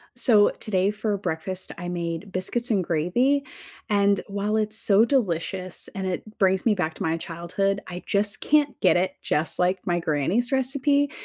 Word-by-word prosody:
So, 220 -4 +6
today 195 -1 -1
for 210 0 -2
breakfast, 185 +1 -4
I 175 - -6
made 170 +2 -4
biscuits 235 +7 -2
and 195 -4 +2
gravy, 240 - +1 0.4
and, 200 -1 +2
while 205 +1 -1
it's 215 0 +1
so 210 +2 +5
delicious 185 - -1
and 190 -1 -3
it 185 - -3 0.2
brings 190 -1 +2
me 220 -3 +3
back 160 -4 -2
to - - -5
my 160 +1 0
childhood, 175 +4 -2
I 180 0 -7
just 205 +1 0
can't 295 -1 +2
get - - +4
it 185 +2 0
just 155 +2 0
like 180 +1 0
my 175 -1 0
granny's 170 - 0
recipe. 280 +2 +1
195 Hz, 170 wpm, -24 LUFS, 175-220 Hz, 0.4 s, So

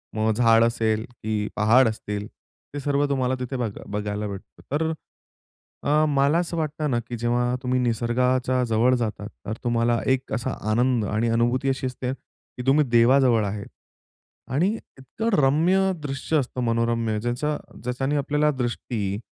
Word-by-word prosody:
मग 110 0 +2
झाड 115 0 +5
असेल 110 -1 +1
की 110 -3 -3
पहाड 115 +4 +5
असतील 105 -1 -4 0.5
ते - - -2
सर्व 145 +1 +1
तुम्हाला 130 -2 +1
तिथे 130 +1 -3
बघ 120 -4 -1 0.2
बघायला 105 0 -3
भेटतो. 100 -1 -9
तर 160 +3 0 0.9
अ, 150 +2 +3
मला 140 +3 +3
असं 175 -1 -2
वाटतं 155 -1 -2
ना 120 - +2
की 120 - -4
जेव्हा 120 +1 0
तुम्ही 125 0 +1
निसर्गाच्या 125 +2 +1
जवळ 120 +3 +3
जातात 110 -3 -3 0.2
तर 110 - -3
तुम्हाला 120 0 +1
एक 130 0 -1
असा 125 +3 -1 0.2
आनंद 120 0 +2
आणि 110 +3 0
अनुभूती 120 +4 +1
अशी 135 0 -1
असते 125 0 -4
की 125 -1 -13
तुम्ही 150 +2 +5
देवाजवळ 120 -1 +4
आहेत. 100 +1 -4 0.8
आणि 160 +8 +2 0.3
इतकं 170 - -3
रम्य 175 +8 +3
दृश्य 140 +2 -1
असतं 130 -2 -2
मनोरम्य 115 -1 0
ज्याचा 120 +6 -1 0.3
ज्याच्याने 135 +4 -1
आपल्याला 150 +1 +1
दृष्टी, 115 -5 -2
125 Hz, 150 wpm, -24 LUFS, 115-135 Hz, 0.9 s, झाड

